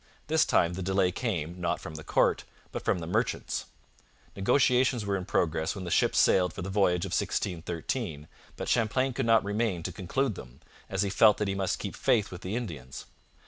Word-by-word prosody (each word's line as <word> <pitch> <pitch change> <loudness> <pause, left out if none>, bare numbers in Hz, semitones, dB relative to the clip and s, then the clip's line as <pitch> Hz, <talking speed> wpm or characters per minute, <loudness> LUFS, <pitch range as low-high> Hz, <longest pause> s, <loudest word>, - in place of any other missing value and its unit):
This 160 +1 +3
time 85 0 +2
the 95 - -5
delay 95 0 +2
came, 90 - -3
not 85 - 0
from 75 - -8
the 75 0 -8
court, - - +2 0.3
but - - -5
from - - +1
the 85 - -5
merchants. 85 - -1 0.7
Negotiations 125 +2 +2
were 100 -1 0
in 95 -2 -3
progress 80 -4 0
when 95 - -6
the 90 - -5
ships - - +2
sailed 90 -2 +4
for - - -6
the 95 - -4
voyage 90 -3 +2
of - - -6
1613, 85 - -2 0.3
but - - -5
Champlain 125 +3 +1
could 125 0 -1
not 115 -2 +5
remain 100 -4 -1
to 90 - -3
conclude 105 +8 -1
them, 65 -6 -11 0.3
as 95 0 0
he 100 - -1
felt 105 +1 +5
that 105 - -1
he 95 - 0
must 95 -1 -1
keep - - -5
faith 110 -3 +1
with 90 -1 -8
the 95 +4 -4
Indians. 75 - -6
95 Hz, 200 wpm, -29 LUFS, 85-115 Hz, 0.7 s, not